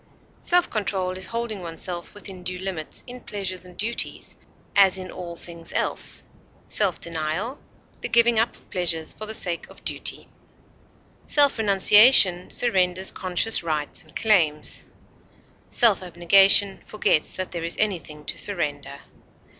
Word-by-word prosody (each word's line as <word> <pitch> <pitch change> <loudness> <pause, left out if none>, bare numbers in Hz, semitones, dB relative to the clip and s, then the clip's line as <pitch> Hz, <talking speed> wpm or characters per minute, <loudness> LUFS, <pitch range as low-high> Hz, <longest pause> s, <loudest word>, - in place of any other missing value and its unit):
Self 355 0 +2
control 195 -4 -2
is 185 0 -7
holding 230 -4 -4
oneself 175 +1 -4
within 195 -3 -8
due 180 0 -4
limits 180 -4 -5
in 250 0 -9
pleasures 185 -3 -5
and 180 -1 -15
duties, 230 +3 0 0.4
as 195 -2 +5
in 185 -1 -7
all 175 -2 -8
things 170 -1 -9
else; - - -1 0.4
self 195 -4 +1
denial, 170 - -4 0.4
the - - -3
giving 235 -1 +4
up 230 - 0
of - - -19
pleasures 165 -3 -1
for 215 - -8
the 220 - -4
sake 175 -4 -1
of - - -16
duty. - - -3 1.0
Self 285 -4 +4
renunciation 200 -2 +6
surrenders 190 -5 +1
conscious 185 +4 +1
rights 155 -3 -3
and 155 - -20
claims; 165 -9 +1 0.8
self 230 -6 +4
abnegation 195 +3 +4
forgets 185 -7 0
that 185 -1 -5
there 170 -2 -5
is 170 +1 -4
anything 165 -8 -3
to - - -4
surrender. 145 -7 -3
185 Hz, 140 wpm, -23 LUFS, 170-210 Hz, 1.0 s, renunciation